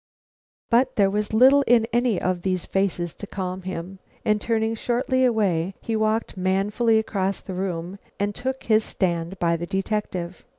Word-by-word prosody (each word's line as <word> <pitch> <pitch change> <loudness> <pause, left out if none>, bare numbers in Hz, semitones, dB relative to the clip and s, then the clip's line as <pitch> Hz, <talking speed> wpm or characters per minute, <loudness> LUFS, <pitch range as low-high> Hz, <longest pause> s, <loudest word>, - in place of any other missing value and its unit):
But 255 +2 +3
there 200 -4 +3
was 210 +1 -1
little 260 +6 +6
in 235 -2 +5
any 240 -4 +2
of 180 -1 -1
these 185 -1 -1
faces 180 -3 -1
to 205 - -9
calm 185 -1 -4
him, 185 +1 -6 0.3
and 210 -1 +2
turning 225 -1 0
shortly 255 +3 0
away, 195 -6 +1
he 225 - -3
walked 220 +1 0
manfully 200 +5 +1
across 200 -3 -1
the 190 - -6
room 180 0 -4 0.2
and 205 +1 0
took 265 +4 -4
his 220 -1 +3
stand 175 -2 -2
by 170 -1 +1
the 170 +1 -5
detective. 190 -3 -3
200 Hz, 165 wpm, -24 LUFS, 185-225 Hz, 0.3 s, little